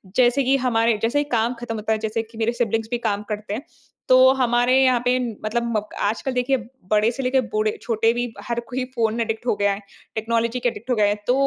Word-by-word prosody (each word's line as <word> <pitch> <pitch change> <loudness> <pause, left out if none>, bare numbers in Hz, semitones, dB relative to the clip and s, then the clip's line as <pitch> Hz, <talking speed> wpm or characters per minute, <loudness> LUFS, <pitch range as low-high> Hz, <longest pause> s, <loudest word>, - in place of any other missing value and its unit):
जैसे 255 +2 +4
कि 265 +2 +3
हमारे 230 -1 +2
जैसे 230 +5 +1
ही - - +2
काम 230 +1 +1
खत्म 235 -1 -4
होता 220 0 -3
है 220 - +2
जैसे 225 +1 -1
कि 225 0 -16
मेरे 225 +1 +1
सिबलिंग्स 225 -2 -1
भी 240 - +1
काम 205 -1 -1
करते 210 -1 -4
हैं। 245 - -4 0.4
तो 255 - +6 0.2
हमारे 245 -1 +2
यहाँ 255 -2 +4
पे 250 +1 +3 0.3
मतलब 235 0 0
अ, 210 0 -6
आजकल 225 +6 -1
देखिए 250 +2 +1 0.3
बड़े 215 +1 +4
से 270 +2 -5
लेके 255 +1 +2
बूढ़े 215 -2 -1
छोटे 225 -1 +2
भी 240 -1 -3
हर 235 0 -1
कोई 255 0 -2
फ़ोन 225 -1 0
एडिक्ट 225 +1 -3
हो - - +2
गया 205 0 +2
है, 195 - -6 0.4
टेक्नोलॉजी 230 +2 0
के 245 - +1
एडिक्ट 230 +2 -11
हो 250 - +3
गए 210 -2 +3
हैं। 205 - +1
तो 245 - +4
230 Hz, 235 wpm, -22 LUFS, 220-245 Hz, 0.4 s, तो